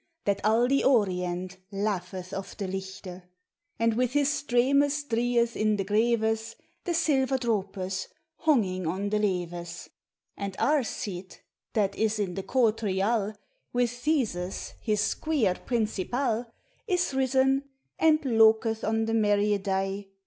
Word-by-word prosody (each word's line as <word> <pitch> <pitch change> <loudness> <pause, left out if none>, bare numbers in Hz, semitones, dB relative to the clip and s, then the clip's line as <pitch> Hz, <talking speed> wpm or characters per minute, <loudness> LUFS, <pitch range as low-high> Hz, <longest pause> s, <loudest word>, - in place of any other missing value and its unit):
That 200 -1 +1
al 225 +3 +4
the 275 +1 +2
orient 185 -6 +1
laugheth 190 -2 -3
of 195 -1 -6
the 200 - -3
Lighte, 190 -1 -6 0.6
And 230 0 +2
with 250 +2 0
his 290 -1 +3
streines 285 +2 +2
dryeth 235 0 +1
in 215 0 +2
the 195 -2 -2
grevefl 225 +1 +1
t - - -34 0.2
The 350 -2 0
silver 275 -5 +2
dropes, 195 -5 -2 0.4
hongyng 185 - +2
on 190 +5 -1
the 210 - +2
leev< 175 -4 -3 0.5
And 200 -1 -5
Arcite, 205 -10 -1 0.3
that 200 -2 +1
is 220 0 +1
in 200 -4 -1
the 195 - -3
courl 230 +1 +2
ryal 210 0 0 0.4
With 245 -1 +2
Theseus, 245 - -2
his 210 -2 +1
squyer 245 -4 +1
principal, 235 +1 -1 0.4
Is 360 -7 +1
risen, 265 +1 +2 0.3
and 315 -1 +5
loketli 225 -3 +3
on 225 0 +1
the 225 - -1
merye 205 -2 +2
day. 195 0 -2
220 Hz, 135 wpm, -27 LUFS, 195-245 Hz, 0.6 s, and